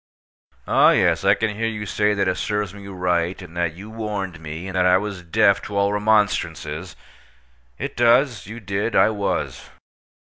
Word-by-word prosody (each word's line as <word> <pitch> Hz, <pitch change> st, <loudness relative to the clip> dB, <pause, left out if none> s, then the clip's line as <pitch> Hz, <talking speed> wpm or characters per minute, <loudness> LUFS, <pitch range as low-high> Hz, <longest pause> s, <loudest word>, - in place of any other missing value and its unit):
Oh, -, -, +5 dB
yes, 85 Hz, -3 st, +2 dB
I 100 Hz, +1 st, +5 dB
can 110 Hz, -1 st, -2 dB
hear 115 Hz, +2 st, -1 dB
you 105 Hz, -2 st, -4 dB
say 105 Hz, +1 st, +1 dB
that 100 Hz, -, 0 dB
it 90 Hz, -, 0 dB
serves 105 Hz, -3 st, -2 dB
me 100 Hz, -1 st, -11 dB
right, 90 Hz, -2 st, -1 dB
and 90 Hz, -3 st, -11 dB
that 85 Hz, -2 st, -1 dB
you 100 Hz, +4 st, -10 dB
warned 105 Hz, -6 st, -4 dB
me, 80 Hz, +2 st, -7 dB
and 95 Hz, -, -6 dB
that 90 Hz, 0 st, +3 dB
I 90 Hz, 0 st, +5 dB
was 100 Hz, -2 st, -4 dB
deaf 100 Hz, +3 st, +3 dB
to 100 Hz, -, -4 dB
all 100 Hz, 0 st, +2 dB
remonstrances. 105 Hz, -6 st, 0 dB, 0.8 s
It -, -, -5 dB
does. 120 Hz, 0 st, +3 dB
You 115 Hz, +3 st, -8 dB
did. 100 Hz, +2 st, -2 dB
I -, -, +5 dB
was. 100 Hz, -2 st, -3 dB
100 Hz, 180 wpm, -22 LUFS, 90-105 Hz, 0.8 s, Oh